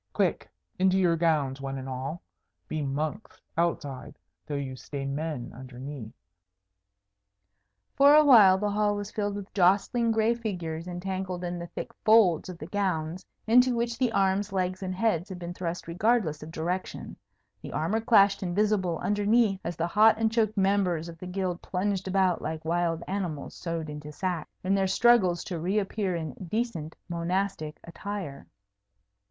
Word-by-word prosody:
"Quick, - - 0 0.3
into 190 0 +4
your 175 -3 +3
gowns, 150 -5 +1
one 135 0 -4
and 130 0 -6
all! 135 +6 -5 0.4
Be 155 - -3
monks 150 +8 -3 0.2
outside, 145 -6 -2 0.3
though 150 - -3
you 135 -2 -4
stay 135 +2 -6
men 140 -2 -3
underneath." 130 -1 -8 1.8
For 285 +1 +7
a 305 0 +7
while 210 -9 +8
the 205 +1 -1
hall 205 0 +1
was 205 -1 -5
filled 205 -1 -2
with 205 -1 -8
jostling 200 +5 +3
gray 225 +1 +3
figures 175 -8 -4
entangled 180 0 -4
in 175 0 -3
the 170 - -6
thick - - -7
folds 205 -6 +5
of 180 - -7
the 155 - -7
gowns, 180 -2 -2 0.2
into 250 +2 +5
which 235 -1 -2
the 250 -3 +2
arms, 195 0 +1
legs, 185 -1 -1
and 185 -1 -3
heads 190 -3 0
had 190 - -6
been 175 0 -6
thrust 175 -1 -4
regardless 180 -3 +1
of 155 - -8
direction; 175 +3 -4 0.5
the - - -8
armour 170 +9 0
clashed 205 -4 +5
invisible 190 -2 +1
underneath 205 0 +2
as 170 - -3
the 165 - 0
hot 215 +5 +5
and 220 0 +1
choked 220 -2 +1
members 190 -4 +1
of 165 -1 -11
the 180 - -7
Guild 180 -1 -2
plunged 190 0 -2
about 190 -2 +2
like 160 0 -5
wild 170 0 0
animals 180 -7 -3
sewed 165 -2 -4
into 150 0 -7
sacks, 175 0 -3
in 190 +1 +1
their 195 -1 +2
struggles 190 -5 +4
to 175 -3 -4
reappear 195 +1 -1
in 160 -4 -4 0.2
decent 195 -9 -2
monastic 170 -2 -2
attire. 175 -4 -6
185 Hz, 160 wpm, -28 LUFS, 160-205 Hz, 1.8 s, while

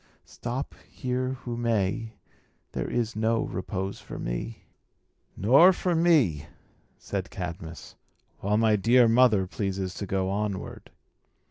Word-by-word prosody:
Stop 125 +4 -5 0.2
here 130 0 -2
who 120 -1 -4
may, 115 -1 -1 0.6
there - - -3
is 120 -1 -1
no 110 +1 +1
repose 95 +1 -4
for - - -9
me." - - -5 0.7
"Nor 140 - +7
for 180 0 -1
me," 145 - +3 0.5
said - - -4
Cadmus, 85 -2 -7 0.4
"while 105 +2 +1
my 110 -1 +4
dear 120 +4 +5
mother 115 -4 +4
pleases 95 -1 -3
to 100 - -5
go 95 0 0
onward." 100 -2 -4
110 Hz, 120 wpm, -27 LUFS, 95-120 Hz, 0.7 s, Nor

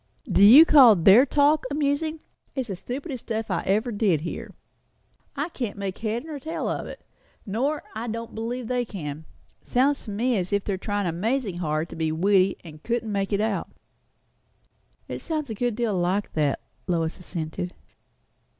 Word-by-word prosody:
"Do - - +1
you 260 +11 +10
call 260 -9 +8
their 195 +10 +6
talk 290 +2 +3
amusing? 300 +2 -1 0.3
It's 260 -4 -3
the 195 - -3
stupidest 260 - -6
stuff 220 -2 -3
I 175 - 0
ever 215 +6 +1
did 200 -8 +1
hear. 170 - -5 0.9
I 295 +4 -2
can't 240 - -5
make 195 -1 -4
head 225 +4 -2
or 305 -3 -6
tail 320 +5 -4
of - - -3
it; - - -10 0.4
nor 260 +9 -1
I 225 +2 -5
don't 230 +1 -5
believe 235 +2 -4
they 250 0 0
can. 160 -8 -7 0.4
Sounds 275 +3 +1
to - - -7
me 230 +4 0
as 185 0 -2
if 200 -1 +1
they 200 - -2
were - - -2
tryin' 205 0 -2
amazin' 200 +4 -1
hard 155 -1 -1
to - - -9
be 160 -1 -1
witty, 190 +3 +3
and 155 -3 -12
couldn't 230 0 -2
make 195 0 -1
it 200 0 +1
out." 215 -2 -1 1.4
"It - - -6
sounds 305 -6 -3
a - - -2
good 240 +1 -1
deal 230 -2 0
like 185 +3 -1
that," 150 -3 0 0.3
Lois 165 -3 -1
assented. 175 0 -5
215 Hz, 175 wpm, -25 LUFS, 185-255 Hz, 1.4 s, you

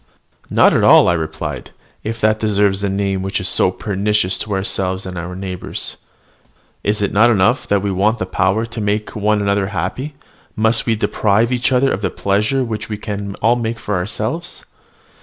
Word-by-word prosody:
"Not - - +5
at - - +2
all," - - +7
I - - +4
replied, 80 -2 -4 0.3
"if 115 +1 -4
that 110 0 +2
deserves 100 -2 +1
the 100 - 0
name 95 -1 -1
which 95 +2 -2
is 95 - -2
so - - +3
pernicious 100 0 0
to 105 - -3
ourselves 95 -1 -1
and 90 -1 -6
our 90 +1 -5
neighbours. 95 -1 -4 0.9
Is 105 0 0
it 100 - 0
not 110 +4 +5
enough 100 -5 +2
that 100 -1 +1
we 100 - 0
want 105 +5 +1
the 95 - -2
power 95 +4 +1
to 115 -1 -6
make 105 +1 -2
one 105 0 +1
another 100 -1 +1
happy, 100 - -4 0.4
must 110 +2 +2
we 115 - +3
deprive 110 +2 +1
each 125 +2 +1
other 130 +1 +3
of 100 - -2
the - - 0
pleasure 105 +7 0
which 110 -2 -4
we 105 - -3
can 100 -1 -5
all 115 +2 +4
make 115 -1 -2
for 105 - -4
ourselves? 110 - -3
105 Hz, 190 wpm, -18 LUFS, 95-110 Hz, 0.9 s, all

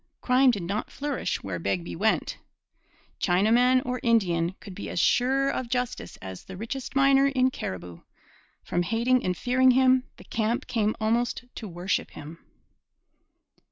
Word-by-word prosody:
Crime 255 +1 +4
did 205 -7 0
not 200 +6 -3
flourish 285 -2 -3
where 90 -3 -4
Begbie 90 -1 -2
went. - - 0 0.8
Chinaman 240 +8 +3
or 250 0 -2
Indian 185 -7 +1
could 195 - -10
be 200 - -7
as - - -2
sure 270 +6 +2
of 250 -2 -4
justice 245 - -3
as 95 -1 -8
the 190 - -9
richest 245 +6 -6
miner 275 0 +5
in 260 -1 +2
Cariboo. 90 - -6 0.6
From 175 - -1
hating 235 +7 +1
and 180 -1 -1
fearing 255 +1 +3
him, 255 0 +4
the - - -13
camp 225 +2 -1
came 215 -2 0
almost 230 +3 0
to 220 - -7
worship 175 +1 -2
him. 155 +3 -10
230 Hz, 150 wpm, -26 LUFS, 175-255 Hz, 0.8 s, miner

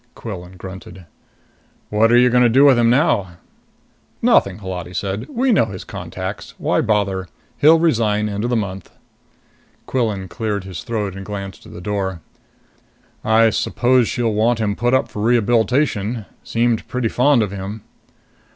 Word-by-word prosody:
Quillan 95 -4 -8
grunted. 95 -1 -10 0.9
"What 110 +2 +3
are 120 - +6
you 125 0 +5
going 125 0 +4
to 120 - +5
do 135 +5 +5
with 140 -2 +7
him 120 -1 +3
now?" 115 - +2 0.9
"Nothing," 95 -2 +3
Holati 90 -3 -6
said. 100 +6 -3
"We 255 +7 +1
know 195 - +4
his 95 -3 -8
contacts. - - -7
Why - - +1
bother? 100 -3 0 0.3
He'll 160 +3 +6
resign 110 -10 +1
end 105 0 -3
of 120 - -1
the 125 - +1
month." 95 -4 -4 1.0
Quillan 110 -7 -1
cleared 105 -2 -3
his 95 -3 -7
throat 105 -5 -3
and 95 - -7
glanced 100 -1 -7
at - - -13
the 85 - -9
door. 95 -2 -3 1.0
"I 110 0 +4
suppose 125 +2 +2
she'll 120 -4 -1
want 110 +3 +2
him 105 -2 -1
put 120 +3 +1
up 130 - +1
for 105 - -7
rehabilitation 115 -1 +1 0.2
seemed 115 -1 0
pretty 125 -2 -1
fond 125 +1 +3
of 100 - -4
him." 100 +2 -6
110 Hz, 160 wpm, -19 LUFS, 95-120 Hz, 1.0 s, with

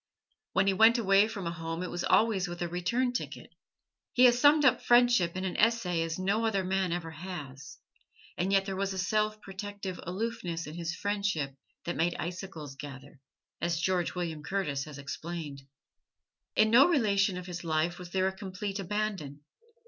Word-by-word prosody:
When 190 - +3
he 195 - +3
went 225 +5 +6
away 200 -2 +4
from 205 -4 -6
home 165 0 -4
it 180 - -5
was 175 - -3
always 215 -4 +3
with 175 0 -7
a - - -1
return 235 +9 0
ticket. - - -5 0.6
He 250 - +4
has 240 -1 +5
summed 295 0 +6
up 255 -2 +4
Friendship 240 -8 +4
in 185 - -2
an 185 - -3
essay 210 -7 +2
as 165 0 -2
no 200 +4 0
other 210 -4 +1
man 190 -1 0
ever 170 -1 -3
has, 150 -6 -8 0.6
and 185 +2 -1
yet 195 -1 +3
there 195 -1 -3
was 195 0 -1
a - - -5
self 215 +3 0
protective 195 -1 -6
aloofness 180 -3 -3
in 150 - -8
his 170 0 -4
friendship 200 -9 -1 0.3
that 175 - -3
made 170 +1 +1
icicles 170 -4 -6
gather, 140 0 -10 0.4
as 170 -1 0
George 180 0 0
William 165 -4 -3
Curtis 150 -5 -2
has 150 -2 -9
explained. 145 0 -6 0.9
In 215 0 +4
no 260 +6 +8
relation 200 - +2
of 180 - -6
his 175 -1 -6
life 165 +2 0
was 180 -1 -8
there 185 +1 +1
a 190 - -1
complete 195 +1 -5
abandon. 195 -7 -3
185 Hz, 180 wpm, -30 LUFS, 170-205 Hz, 0.9 s, no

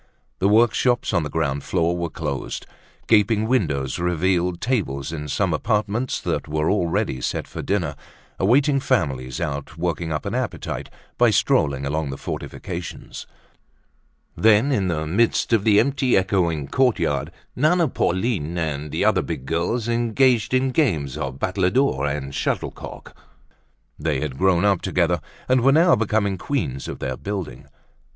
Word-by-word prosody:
The 95 - +3
workshops 120 +2 +3
on 85 - +3
the 75 - -4
ground 70 -2 -1
floor 85 -1 0
were 85 -1 -2
closed. 75 -4 -4 0.4
Gaping 110 0 +3
windows 70 - 0
revealed 90 0 0
tables 85 - -1
in 75 -2 -5
some 90 +4 0
apartments 105 +7 0
that - - -2
were 75 +2 0
already 85 -9 0
set - - -2
for - - -6
dinner, 85 -7 -1 0.4
awaiting 135 +8 +3
families 65 - -1
out 75 +2 -4
working 85 -1 -2
up 75 - -3
an 100 - -3
appetite 130 0 -3 0.3
by - - +6
strolling 70 -2 +2
along 75 +1 -1
the 70 - -5
fortifications. 90 +4 -6 1.1
Then, 110 +5 +4
in 100 -8 +1
the 80 -3 -1
midst 110 +8 +1
of 110 -3 +3
the 105 -1 +5
empty, 135 -4 +2
echoing 85 -6 +1
courtyard, 90 - +1 0.2
Nana, 160 +5 +3
Pauline 95 - -1
and 75 -3 -3
other - - +3
big 65 - -5
girls 85 - -1
engaged 120 0 +2
in 130 +1 +2
games 80 - 0
of 65 -1 -4
battledore 95 - +1
and 70 -1 -4
shuttlecock. - - -4 0.8
They 75 -2 0
had 65 -2 -4
grown 95 0 +3
up 100 -4 +3
together 85 -2 +1 0.3
and 130 0 +3
were 135 +3 +5
now 165 +4 +5
becoming 100 -3 0
queens 70 - -2
of - - -5
their - - -4
building. 100 -4 -5
90 Hz, 145 wpm, -22 LUFS, 75-115 Hz, 1.1 s, by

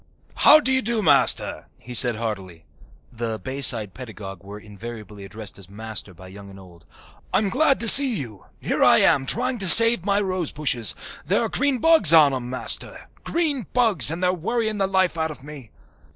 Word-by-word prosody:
"How 305 - +5
do 265 -3 -3
you 260 0 +1
do, 230 -3 -3
Master?" 145 -5 +1
he 125 - -12
said 120 -1 +2
heartily. 95 -7 -8 0.5
(The 115 -1 -5
Bayside 125 -6 -1
pedagogue 105 -7 -11
was 105 +2 -12
invariably 105 -1 -11
addressed 105 0 -8
as 95 -2 -13
"Master" 110 -1 -8
by 95 +2 -15
young 100 +1 -13
and 95 0 -15
old.) 90 -3 -18 0.5
"I'm 205 -1 -1
glad 275 +6 0
to 230 - -3
see 270 +1 +6
you. 115 - -8
Here - - -2
I - - +4
am, 135 -1 +1
trying 250 +1 -2
to 190 -3 -1
save 230 -1 +8
my 200 +1 0
rosebushes. 155 - 0 0.3
There 185 +8 -1
are 225 - -4
green 260 +8 -2
bugs 280 - +3
on 150 -4 +4
'em, 125 -2 -6
Master 130 - -6
green 295 - -3
bugs, 230 -9 +2
and 165 +3 -5
they're 180 0 +1
worrying 215 +4 -4
the 195 - 0
life 190 -3 -1
out 160 0 -2
of 145 -4 -11
me." 145 -5 -12
145 Hz, 185 wpm, -21 LUFS, -, 0.5 s, save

